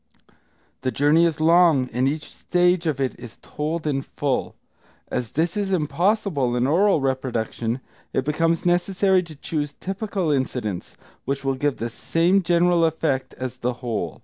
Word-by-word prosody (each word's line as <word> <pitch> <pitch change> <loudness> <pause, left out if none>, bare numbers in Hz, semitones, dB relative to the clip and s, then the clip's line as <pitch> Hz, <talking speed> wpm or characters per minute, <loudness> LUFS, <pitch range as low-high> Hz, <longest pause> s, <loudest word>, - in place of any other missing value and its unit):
The 130 - 0
journey 145 +7 +4
is 160 -2 -3
long, 165 -4 +5
and 125 +3 +2
each 150 +3 -2
stage 180 -1 +1
of 145 -4 -1
it 130 -2 -2
is 120 -2 -11
told 155 +2 -3
in 140 -3 0
full. 135 -1 -2 0.5
As 120 -3 -2
this 165 +3 0
is 200 -2 -1
impossible 170 - +1
in 125 0 +1
oral 180 +6 +3
reproduction, 125 -2 -2 0.3
it 130 - -1
becomes 165 +3 +1
necessary 185 +2 +3
to 165 -3 -11
choose 145 0 -3
typical 195 -3 -2
incidents, 125 -9 -2 0.3
which 135 +1 -2
will 135 - +2
give 140 +1 -1
the 115 +1 -4
same 170 - +2
general 175 0 +3
effect 155 -4 0
as 130 0 -5
the 125 0 -1
whole. 105 - -3
150 Hz, 155 wpm, -23 LUFS, 130-175 Hz, 0.5 s, long